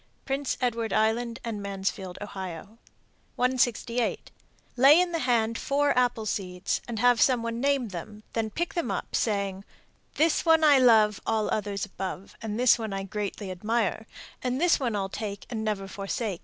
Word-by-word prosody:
Prince 275 0 -1
Edward 230 -3 -1
Island 230 +2 +1
and 225 -4 -4
Mansfield, 195 -2 -4
O. - - -3
168. 230 +6 -3 0.4
Lay 275 +6 +7
in 360 -1 +1
the 335 - -1
hand 230 -3 +1
four 285 +1 +1
apple 245 -3 +1
seeds 185 -3 -2
and 235 -2 -4
have 245 +1 +4
some 250 -3 +3
one 230 0 -3
name 275 -4 +1
them, 210 +4 -8
then 225 -1 -1
pick 345 +10 -3
them 340 - -2
up, - - -3
saying, 200 -3 -1 0.5
This 320 0 +2
one 325 -1 +4
I 290 -3 +7
love 220 -4 +5
all 220 -1 0
others 205 -2 -2
above, 190 0 -6
And 220 0 -4
this 250 -1 +5
one 220 -3 -4
I 195 0 -3
greatly 200 0 -4
admire, 220 +3 -1 0.3
And 255 +1 -1
this 350 +1 +3
one 240 -5 -1
I'll 195 -1 -1
take 200 0 -6
and 220 -2 -3
never 205 -3 -2
forsake. 195 0 -3
225 Hz, 170 wpm, -27 LUFS, 200-250 Hz, 0.5 s, Lay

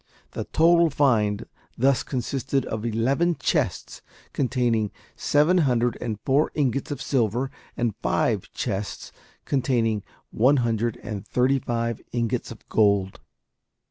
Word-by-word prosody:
The - - -4
total 170 +1 +4
find 115 -8 +2 0.3
thus 135 +1 +3
consisted 135 +1 -2
of 110 -1 -4
eleven 135 +10 +1
chests - - -1 0.3
containing 120 -5 +1 0.3
seven 155 +5 +3
hundred 125 -5 +2
and 110 -3 -3
four 140 +3 +3
ingots 140 -3 0
of 145 -3 -4
silver, 125 -1 0 0.3
and 120 -3 0
five - - 0
chests 100 +1 -4 0.3
containing 120 -5 +1 0.3
one 130 +6 +4
hundred 115 0 0
and 105 -3 -5
thirty 130 +2 +2
five 115 -2 -2
ingots 120 0 -1
of 115 - -12
gold. 100 -3 +2
120 Hz, 120 wpm, -25 LUFS, 110-135 Hz, 0.3 s, total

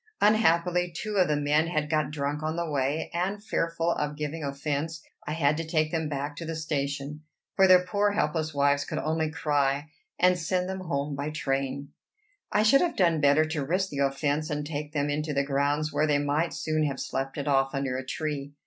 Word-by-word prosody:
Unhappily, 180 -4 +3
two 210 +5 -4
of 185 -2 +4
the 150 - +1
men 150 +2 +2
had 155 -3 -1
got 155 -2 +1
drunk 145 0 -2
on 155 +1 -2
the 170 0 -2
way; 145 +1 -1
and, 195 +4 -2
fearful 165 -4 0
of 150 -2 -2
giving 150 +1 -4
offence, 145 +3 -3 0.2
I 150 - -1
had 150 -2 +2
to 165 - -2
take 155 -1 0
them 160 -2 -1
back 145 0 -3
to 165 - -5
the 165 0 -4
station. 145 -1 -3 0.3
for 190 -1 +6
their 180 -1 +6
poor 205 +2 +1
helpless 155 -4 0
wives 140 0 +2
could 155 - -5
only 160 0 0
cry, 145 -1 0 0.3
and 180 0 +4
send 180 +2 0
them 190 0 -4
home 145 -5 -2
by 140 +2 -3
train. 135 -2 -2 0.6
I 210 - +3
should 250 +6 +6
have 345 -2 0
done 170 -5 +3
better 145 +2 +5
to 155 -2 -2
risk 185 +7 0
the 140 - -5
offence, 145 +3 0
and 150 -1 -2
take 150 -1 -4
them 145 -1 0
into 150 0 -2
the 140 - +2
grounds, 145 +2 0
where 155 - +2
they 145 -1 +3
might 145 +4 0
soon 155 0 0
have 140 -2 -2
slept 135 +2 -3
it 145 0 -3
off 135 0 +2
under 135 -2 -1
a 130 - -3
tree. 145 0 -4
150 Hz, 210 wpm, -27 LUFS, 145-165 Hz, 0.6 s, for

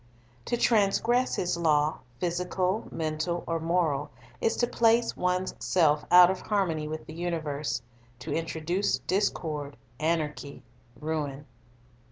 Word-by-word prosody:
To 240 - 0
transgress 235 +3 +2
His 175 -1 -1
law, 155 -2 +2 0.2
physical, 180 +3 -1
mental, 160 +2 -2
or 165 0 -1
moral, 160 -4 0 0.3
is 225 - +2
to 240 - +3
place 230 0 +3
one's 180 +1 0
self 155 -4 +3
out 180 0 +8
of 190 - -5
harmony 170 -7 0
with 155 +1 -5
the 155 - -9
universe, 155 -6 -3 0.3
to 125 - -5
introduce 165 +4 -1
discord, 155 -7 -2 0.2
anarchy, 155 -3 -2 0.4
ruin. 150 -2 -3
165 Hz, 120 wpm, -28 LUFS, 155-185 Hz, 0.4 s, out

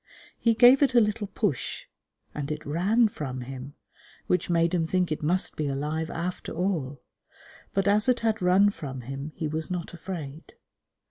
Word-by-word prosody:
He 230 -1 +3
gave 250 +4 +7
it 270 -3 +3
a - - +8
little 210 -1 0
push, 195 - -2 0.5
and 145 0 -4
it 150 - -5
ran 195 +10 +3
from 135 -10 -5
him, 135 +2 -8 0.5
which 180 -1 0
made 170 0 +2
him 175 -2 +2
think 180 +1 0
it 155 - -2
must 175 +5 +1
be 150 - -2
alive 150 +3 -2
after 175 +2 -4
all; 160 -7 -2 0.7
but, 195 0 +1
as 210 +4 +4
it 250 -1 +2
had 225 -1 0
run 190 +3 +5
from 135 -8 -7
him, 135 +4 -6
he 160 - -2
was 155 +1 -3
not 180 -1 -4
afraid. 160 -3 -7
170 Hz, 175 wpm, -27 LUFS, 150-200 Hz, 0.7 s, a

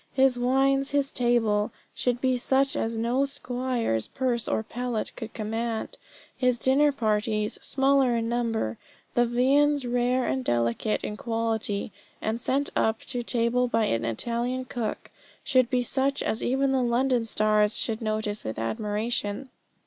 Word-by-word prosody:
His 265 -1 +4
wines, 270 +2 +2
his 280 -1 +1
table, 225 -4 +1 0.2
should 245 -1 -1
be 260 -1 +2
such 265 +2 +1
as 225 0 -1
no 240 +4 +1
squire's 250 - -1
purse 245 -3 -1
or 220 - 0
palate 240 0 -3
could 225 -3 -7
command. 225 +1 -3 0.4
His 250 -2 +2
dinner 275 +5 +3
parties 215 -3 -1
small 275 +1 +2
in 235 -3 +1
number, 230 - -1 0.3
the 240 0 +3
viands 275 +3 +3
rare 245 +1 +1
and 130 0 -1
delicate 120 - 0
in 210 - -4
quality, 225 -3 -1 0.3
and 225 +2 -2
sent 275 +3 0
up 220 0 +1
to 245 -2 -3
table 240 +1 +1
by 225 -2 +1
an 115 - 0
Italian 235 - -2
cook 235 -4 -4 0.3
should 255 -4 +3
be 250 -2 +1
such 270 +3 0
as 220 - -1
even 270 +2 +1
the 265 -1 +2
London 245 0 +1
stars 215 -1 +2
should 225 -1 -2
notice 215 -1 -2
with 110 - -5
admiration. 210 - -2
240 Hz, 150 wpm, -26 LUFS, 220-260 Hz, 0.4 s, His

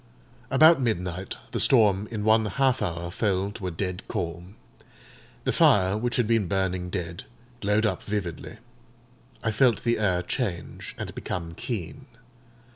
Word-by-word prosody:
About 155 +3 +6
midnight, 90 -5 -2
the - - -2
storm 105 -5 +4
in 110 -3 -4
one 110 0 +4
half 130 +4 +1
hour 85 0 -3
fell 100 0 0
to 105 -3 -6
a - - 0
dead 90 +1 -3
calm. 85 +3 -4 0.9
The - - 0
fire, 95 -1 +4
which 120 +3 -1
had 125 - +2
been 110 -3 +2
burning 95 -1 -1
dead, 85 -2 -5 0.3
glowed 105 +1 +2
up 95 -4 0
vividly. 100 -1 -4 0.9
I 115 - +1
felt 120 0 +3
the 120 -1 +1
air 90 -4 +1
change, 90 -2 -4
and - - -5
become 85 -2 -5
keen. 115 - -5
100 Hz, 145 wpm, -26 LUFS, 90-115 Hz, 0.9 s, About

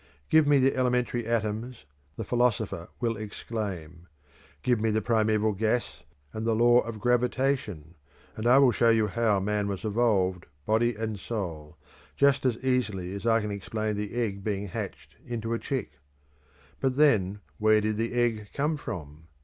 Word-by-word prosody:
Give 155 -2 +5
me 145 -1 +5
the 135 0 +3
elementary 125 -2 0
atoms, 115 - -2 0.3
the 115 - -4
philosopher 110 -7 0
will 115 -2 0
exclaim; 100 -6 -6 0.6
give 120 -3 +2
me 110 - +2
the 110 0 +1
primeval 110 -1 +1
gas 110 +4 -1 0.3
and 110 - -4
the 115 -1 +1
law 120 +2 +5
of 115 -2 -4
gravitation, 125 - 0 0.4
and 110 +2 -2
I 125 +2 +7
will 135 -3 +6
show 115 0 +3
you 110 -1 +4
how 105 -1 +1
man 105 +1 -1
was 100 +1 -4
evolved, 100 -5 +1 0.2
body 115 +2 +2
and 110 -1 -4
soul, 85 -8 -5 0.4
just 140 -1 +3
as 120 -3 0
easily 105 -8 -1
as 100 +3 -4
I 115 0 +4
can 105 0 -3
explain 110 +2 -3
the 105 +2 -4
egg 105 -5 -2
being 100 -1 -2
hatched - - -7
into 115 -1 -4
a 115 - -1
chick. 135 -2 -4 0.8
But, 130 -1 0
then, 105 -9 +3 0.2
where 110 0 +5
did 105 0 -1
the 115 +1 -2
egg 115 -4 0
come 150 +2 0
from? 80 - -8
110 Hz, 165 wpm, -27 LUFS, 100-120 Hz, 0.8 s, I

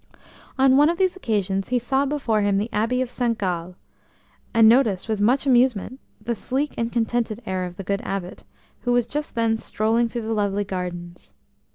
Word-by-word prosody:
On 265 0 +5
one 295 +2 +6
of 340 - -1
these 375 -1 +1
occasions 200 - -1
he 250 - +2
saw 265 +3 0
before 265 -7 0
him 200 -1 +2
the 210 +4 -2
Abbey 230 +5 +1
of 250 - -8
St 235 -3 -1
Gall, 180 -2 -3 0.8
and 225 -1 +6
noticed 225 -6 +3
with 215 -2 -1
much 255 +7 +2
amusement 250 -2 +2 0.2
the 225 +2 -2
sleek 265 +6 -2
and 230 0 -2
contented 230 -1 -1
air 185 -1 -2
of 180 0 -9
the 195 - -6
good 200 +2 -2
Abbot, 195 -5 -5 0.4
who 245 - 0
was 245 -1 +2
just 295 +5 -5
then 225 -1 +1
strolling 225 +2 0
through 235 0 -4
the 225 +1 -2
lovely 205 -1 0
gardens. 175 -2 -6
225 Hz, 190 wpm, -23 LUFS, 200-250 Hz, 0.8 s, one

